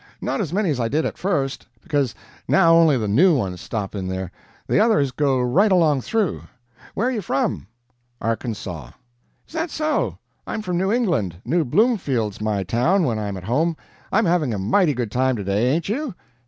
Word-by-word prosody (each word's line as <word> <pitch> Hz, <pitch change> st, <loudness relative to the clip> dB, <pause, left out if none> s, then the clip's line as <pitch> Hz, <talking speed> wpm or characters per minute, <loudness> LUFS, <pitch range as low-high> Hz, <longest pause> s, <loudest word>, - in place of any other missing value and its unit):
Not -, -, -2 dB
as 170 Hz, -7 st, -3 dB
many 195 Hz, -2 st, +1 dB
as 135 Hz, -, -2 dB
I 115 Hz, -, +1 dB
did 150 Hz, +7 st, 0 dB
at -, -, -4 dB
first, 145 Hz, -8 st, -1 dB, 0.2 s
because 145 Hz, -7 st, 0 dB, 0.3 s
now 165 Hz, 0 st, +5 dB
only 165 Hz, -4 st, +5 dB
the 110 Hz, -3 st, -2 dB
new 155 Hz, -, +4 dB
ones 95 Hz, -6 st, -3 dB
stop 105 Hz, -4 st, -4 dB
in 95 Hz, -3 st, -4 dB
there 95 Hz, -1 st, -4 dB, 0.3 s
the -, -, +2 dB
others 210 Hz, -, +3 dB
go 135 Hz, -1 st, +1 dB
right 175 Hz, -, +3 dB
along 160 Hz, -7 st, +3 dB
through. 215 Hz, -, -1 dB, 0.5 s
Where 230 Hz, -, +1 dB
are -, -, +1 dB
you 230 Hz, -5 st, -2 dB
from?" 135 Hz, -, -1 dB, 0.5 s
"Arkansaw." 105 Hz, -, -4 dB, 0.5 s
"Is -, -, -20 dB
that 330 Hz, +1 st, -2 dB
so? 310 Hz, +1 st, -1 dB, 0.3 s
I'm 215 Hz, -, -3 dB
from 180 Hz, -3 st, -1 dB
New 190 Hz, +2 st, +1 dB
England 170 Hz, -, 0 dB
New 165 Hz, +7 st, +2 dB
Bloomfield's 135 Hz, -, +1 dB
my 105 Hz, -2 st, 0 dB
town 125 Hz, -, +2 dB
when 115 Hz, -7 st, 0 dB
I'm 100 Hz, -2 st, -3 dB
at 90 Hz, -, -9 dB
home. 155 Hz, -, 0 dB, 0.3 s
I'm 220 Hz, +2 st, +3 dB
having 165 Hz, -9 st, +1 dB
a -, -, -3 dB
mighty 145 Hz, -, +2 dB
good 120 Hz, -4 st, -3 dB
time 130 Hz, +2 st, +1 dB
today, 100 Hz, +3 st, 0 dB
ain't 160 Hz, +3 st, 0 dB
you?" 250 Hz, -, -3 dB
140 Hz, 190 wpm, -22 LUFS, 110-185 Hz, 0.5 s, now